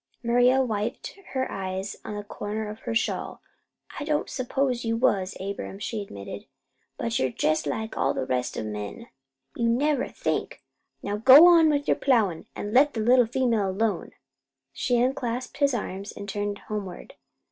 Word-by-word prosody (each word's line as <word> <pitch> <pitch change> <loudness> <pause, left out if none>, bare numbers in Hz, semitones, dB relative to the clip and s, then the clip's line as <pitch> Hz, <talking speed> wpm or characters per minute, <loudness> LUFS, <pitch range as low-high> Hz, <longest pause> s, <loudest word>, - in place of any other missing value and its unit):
Maria 245 +3 +4
wiped 220 +1 -3 0.2
her 260 -1 0
eyes 190 +1 -4
on 210 - -6
the 205 - -5
corner 210 +1 -5
of 210 +1 -7
her 230 - -4
shawl. - - -1 0.6
"I - - -3
don't 300 0 -1
s'pose 255 -1 -1
you 230 0 0
was, 195 -6 +1
Abram," 195 0 -5
she 210 +1 -4
admitted; 100 - -8 0.5
"but 115 0 -1
you're 130 - +1
jest 155 +4 0
like 220 +9 -3
all - - +1
the - - -2
rest 125 -1 -2
o' - - -2
the 110 - -4
men. 105 - -7 0.5
You 235 -1 +1
never 275 +3 +1
think! - - -3 0.4
Now 205 +1 -2
you - - -9
go 270 +8 +10
on 335 -3 +7
with 290 -1 0
your - - +3
plowin' 215 - +1
an' 205 +1 -5
let 285 +2 +5
that - - -2
little 245 +1 +5
female 230 -5 +1
alone." 200 -1 -1 0.6
She 245 - 0
unclasped 250 0 -1
his 280 -2 +2
arms 200 -2 -5
and 200 - -8
turned 205 0 -3
homeward. 200 -4 -6
225 Hz, 175 wpm, -26 LUFS, 200-255 Hz, 0.6 s, go